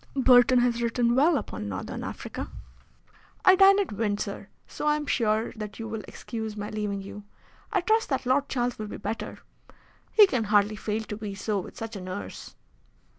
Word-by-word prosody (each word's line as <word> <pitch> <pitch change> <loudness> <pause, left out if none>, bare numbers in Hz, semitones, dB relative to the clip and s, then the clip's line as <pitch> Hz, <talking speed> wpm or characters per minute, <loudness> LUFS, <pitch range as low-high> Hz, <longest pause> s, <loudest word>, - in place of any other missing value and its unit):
Burton 255 -1 +6
has 240 -1 +1
written 235 0 +1
well 295 +5 +4
upon 105 - -5
Northern 100 0 -5
Africa. - - -6 1.0
I 375 - +8
dine 390 +1 +7
at 400 - -1
Windsor, 205 -2 -3 0.2
so 300 - -5
I 300 - +4
am 300 0 -3
sure 220 -4 +1
that 215 -1 -7
you 225 - -5
will 220 -1 -4
excuse 220 -2 -6
my 205 0 -5
leaving 205 -2 -3
you. 205 +1 -9 0.5
I 390 -4 +2
trust 440 +5 +2
that 270 -2 -1
Lord 270 +3 +2
Charles 245 -2 -1
will 215 - -4
be - - -7
better. 225 - -5 0.7
He 425 - +8
can 255 - -1
hardly 205 0 +3
fail 215 +2 -3
to 210 -1 -6
be 210 -2 -6
so 205 +1 -1
with 180 - -9
such 225 0 -6
a 195 - -6
nurse." 185 +2 -7
225 Hz, 185 wpm, -27 LUFS, 210-260 Hz, 1.0 s, I